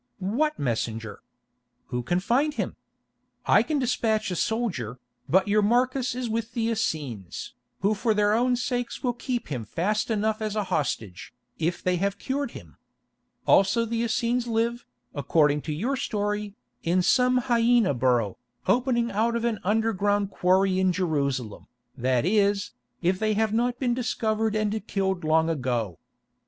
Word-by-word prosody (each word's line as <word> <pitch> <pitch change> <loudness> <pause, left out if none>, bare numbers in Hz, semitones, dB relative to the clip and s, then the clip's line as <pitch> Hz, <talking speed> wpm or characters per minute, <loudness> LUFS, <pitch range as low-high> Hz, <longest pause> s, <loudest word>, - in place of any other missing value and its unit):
What 250 +11 0
messenger? 115 -4 -3 0.7
Who 125 -1 -2
can 175 +9 0
find 275 +10 +1
him? - - -2 0.7
I - - +5
can 310 - -1
despatch 225 -5 0
a - - -1
soldier, 175 - -1 0.3
but 190 +3 +4
your 210 +1 +3
Marcus 250 +3 +1
is 250 -1 -2
with 225 0 -3
the 230 -1 0
Essenes, 150 - -3 0.3
who 200 +2 +3
for 215 +1 0
their 205 0 +3
own 245 +2 +3
sakes 245 0 -3
will 245 -2 +1
keep 245 0 -4
him 125 -6 -3
fast 210 - -1
enough 220 0 0
as 215 -1 -2
a 210 - +1
hostage, 110 -7 -3 0.2
if 170 +2 -1
they 180 -1 +1
have 200 +2 -1
cured 275 +4 -2
him. - - -14 0.7
Also 195 +4 +4
the 230 0 -2
Essenes 235 +1 0
live, 235 +1 -1 0.3
according 150 0 +2
to - - 0
your 225 - -1
story, 210 -3 -2 0.3
in 180 +2 +1
some 250 +4 +3
hyæna 235 - +3
burrow, 120 -5 +1 0.3
opening 240 -2 +2
out 225 +3 +1
of 235 0 -1
an 225 -3 0
underground 205 -1 +1
quarry 185 +1 +2
in 185 -1 +3
Jerusalem, 140 - -2 0.3
that 130 0 +1
is, 200 0 +2 0.3
if 185 +2 +2
they 215 -1 +1
have 220 0 +1
not 240 +2 +1
been 250 -2 0
discovered 220 -2 0
and 215 0 0
killed 190 -3 -1
long 160 +1 +3
ago. 120 - -2
210 Hz, 155 wpm, -26 LUFS, 165-235 Hz, 0.7 s, I